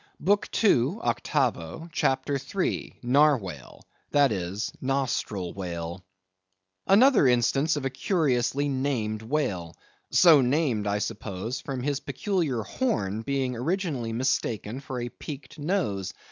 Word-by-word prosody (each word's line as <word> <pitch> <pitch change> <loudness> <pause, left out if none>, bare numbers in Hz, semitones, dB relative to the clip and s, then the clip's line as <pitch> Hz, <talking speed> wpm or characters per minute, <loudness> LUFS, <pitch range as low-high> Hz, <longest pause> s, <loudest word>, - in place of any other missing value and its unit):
BOOK 205 +4 +2
II. 155 - +4
(Octavo), 120 - -1
CHAPTER 135 -1 0 0.2
III. 190 - -1
(Narwhale), 125 - +1 0.3
that 145 -3 +4
is, 95 +2 -3
Nostril 130 -9 -1
whale.—Another 95 - 0
instance 130 +5 +2
of 145 -2 -3
a 135 - -1
curiously 140 - +1
named 130 -6 -1
whale, 105 - -2 0.3
so 165 -6 +7
named 125 -5 +1
I 100 0 +1
suppose 105 +3 -4
from 130 -3 -4
his 145 0 0
peculiar 145 - -1
horn 110 - -1
being 130 0 -1
originally 145 - -2
mistaken 115 -1 -1
for 130 -2 -5
a 120 0 -3
peaked 150 +3 -9
nose. 145 - -1
125 Hz, 115 wpm, -27 LUFS, 100-145 Hz, 0.3 s, so